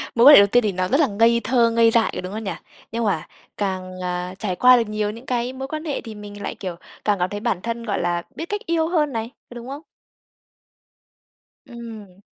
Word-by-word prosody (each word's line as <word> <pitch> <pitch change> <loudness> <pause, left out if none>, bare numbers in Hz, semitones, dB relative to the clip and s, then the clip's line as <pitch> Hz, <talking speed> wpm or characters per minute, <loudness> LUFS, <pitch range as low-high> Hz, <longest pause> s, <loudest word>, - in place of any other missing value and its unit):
mối 235 +1 +5
quan 290 +1 +11
hệ - - +10
đầu 200 - +4
tiên 245 +3 +3
thì 210 - +1
nó 185 0 -1
rất 270 +9 +2
là 310 - +4
ngây 230 +2 +3
thơ, 235 0 +3
ngây 230 0 +4
dại 225 -1 +3
rồi - - -3
đúng 185 +2 -7
không 220 +1 -5
nhỉ? 195 - -3 0.4
Nhưng 230 +1 -2
mà 180 -7 -1 0.3
càng, 185 -2 -3
à, 180 0 -3
trải 190 -4 -2
qua 250 +3 +7
được 230 -3 0
nhiều 215 -1 -1
những 230 +4 -11
cái 250 0 -1
mối 265 +1 -6
quan 310 +3 -5
hệ 290 -4 -2
thì 225 -3 -9
mình 205 0 -10
lại, - - -4
kiểu, 185 -3 -6 0.3
càng 205 -3 +2
cảm 180 +1 0
thấy 205 - -5
bản 185 -3 -1
thân, 230 +1 -4
gọi 210 -4 -2
là, 175 0 -1
biết 330 - -5
cách 415 0 -2
yêu 330 -1 +1
hơn 310 -4 +1
này, 225 0 -3 0.2
có 240 - -12
đúng 240 0 -8
không? 280 +3 -6 1.9
Ừm. 225 -6 -10
225 Hz, 245 wpm, -22 LUFS, 195-245 Hz, 1.9 s, quan